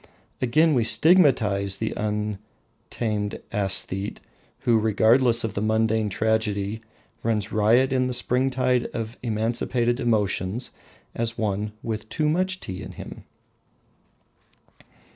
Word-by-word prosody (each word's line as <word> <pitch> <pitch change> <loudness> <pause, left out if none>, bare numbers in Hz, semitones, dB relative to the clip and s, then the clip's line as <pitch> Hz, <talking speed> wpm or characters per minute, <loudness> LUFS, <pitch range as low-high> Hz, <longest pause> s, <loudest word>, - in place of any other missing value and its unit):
Again 155 +6 +3
we 120 -4 +3
stigmatise 110 - +3
the 110 - -2
untamed 105 0 -4
aesthete 100 -1 -1 0.4
who, 115 -2 +3
regardless 115 +3 +3
of 115 - -2
the 100 - -2
mundane 110 0 +1
tragedy, 110 0 -1 0.4
runs 110 -3 -1
riot 115 +5 +3
in 130 -1 +2
the 125 - -2
springtide 125 0 +1
of 115 0 -4
emancipated 120 +2 0
emotions, 105 -1 0 0.4
as 115 0 -2
one 105 0 -2
"with 110 -1 -4
too 155 - 0
much 185 +4 0
tea" 95 - -6
in - - -8
him. - - -10
110 Hz, 110 wpm, -24 LUFS, 105-125 Hz, 0.4 s, Again